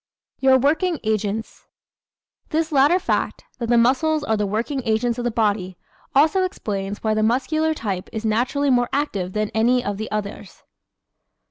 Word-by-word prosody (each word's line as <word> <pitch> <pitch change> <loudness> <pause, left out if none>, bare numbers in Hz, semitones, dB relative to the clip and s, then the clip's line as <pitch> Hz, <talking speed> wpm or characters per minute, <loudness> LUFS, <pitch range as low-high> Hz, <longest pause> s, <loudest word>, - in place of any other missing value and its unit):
Your 265 -1 +5
Working 320 +6 +1
Agents 215 0 -3 0.8
¶ - - -35
This 320 +1 -1
latter 290 +5 +4
fact 375 - -2 0.2
that 235 -2 -3
the 240 - +4
muscles 290 +6 +2
are 220 -7 +1
the 210 -1 -1
working 235 +7 -2
agents 235 +1 0
of - - -2
the 240 - +1
body 205 -5 -1 0.4
also 315 +7 +4
explains 205 - -4
why 220 -1 +1
the 215 - 0
Muscular 290 +8 +1
type 195 -8 -4
is 220 0 -5
naturally 250 +6 +1
more 245 -1 +2
active 200 -11 -2
than 215 0 -1
any 245 +3 +2
of 205 -1 -2
the 215 +1 -5
others. 210 -1 -6
235 Hz, 165 wpm, -22 LUFS, 215-285 Hz, 0.8 s, Your